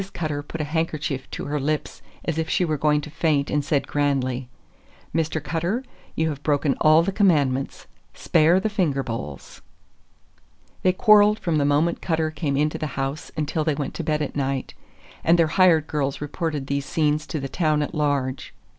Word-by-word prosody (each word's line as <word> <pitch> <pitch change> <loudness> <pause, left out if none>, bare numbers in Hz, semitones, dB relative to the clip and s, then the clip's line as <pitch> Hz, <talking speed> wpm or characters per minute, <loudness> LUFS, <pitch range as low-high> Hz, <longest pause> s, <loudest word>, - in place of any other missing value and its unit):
Cutter 155 -4 -2
put 155 +3 -8
her 150 - -1
handkerchief 155 -3 -2
to - - -5
her 150 +1 -2
lips 150 +2 -2 0.2
as 165 -1 -1
if 160 -1 -2
she 180 - +2
were 155 -2 0
going 150 +1 +2
to 150 - -9
faint 150 -2 0
and 150 -1 +1
said 145 -1 0
grandly: 130 -3 -1 0.6
"Mr. 160 -1 0
Cutter, 170 - -1 0.3
you 160 0 +1
have 145 -2 -5
broken 145 -1 +1
all 155 +2 +6
the 195 - -1
Commandments—spare 155 0 +1
the 195 - -1
finger 175 -10 0
bowls!" 95 - -7 1.2
They 185 - +4
quarreled 210 +1 +5
from 170 -7 -1
the 145 - +2
moment 150 +4 +1
Cutter 160 -2 0
came 145 -2 -2
into 150 +1 0
the 155 - -2
house 135 +3 -3
until 155 +1 -1
they 155 -2 0
went 140 -2 -4
to 170 - -4
bed 155 -1 0
at 145 - -5
night, 135 -2 -2 0.5
and 170 +1 +4
their 165 - +5
hired 175 -5 +5
girls 140 -3 -2
reported 150 -1 -3
these 140 0 -2
scenes 150 0 0
to 155 - -3
the 135 - -4
town 155 0 +1
at 145 - -5
large. 140 -4 -1
Mrs. - - -39
150 Hz, 185 wpm, -23 LUFS, 140-165 Hz, 1.2 s, all